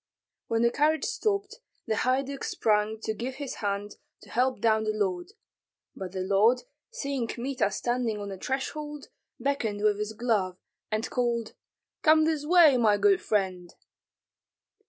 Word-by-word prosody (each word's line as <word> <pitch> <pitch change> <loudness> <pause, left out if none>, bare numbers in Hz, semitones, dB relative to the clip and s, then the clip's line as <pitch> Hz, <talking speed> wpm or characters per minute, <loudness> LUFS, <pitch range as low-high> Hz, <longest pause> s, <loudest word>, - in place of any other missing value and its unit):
When 230 0 +1
the 235 - +4
carriage 310 +3 +2
stopped, 400 -2 -1 0.3
the - - 0
haiduk 265 +4 0
sprang 215 0 +1
to 220 - -2
give 245 +5 -5
his 280 -1 -6
hand 205 0 -3 0.3
to - - -15
help 255 -1 +1
down 220 0 +3
the 215 0 -1
lord; 190 - -2 0.6
but 190 -2 -6
the 190 0 -4
lord, 210 +6 +3 0.3
seeing 275 -4 -3
Kmita 255 -2 -1
standing 240 +1 -1
on 205 0 -5
the 195 -1 -7
threshold, 295 +3 -4 0.3
beckoned 225 -7 -1
with 210 -1 +3
his 210 +1 -3
glove, 210 -6 0 0.3
and 215 +2 -1
called, 235 -3 -1 0.5
"Come 315 -1 +5
this 310 -2 -1
way, 330 -6 +7
my 215 -4 +4
good 395 - +4
friend!" 185 -4 -1
230 Hz, 150 wpm, -28 LUFS, 210-275 Hz, 0.6 s, way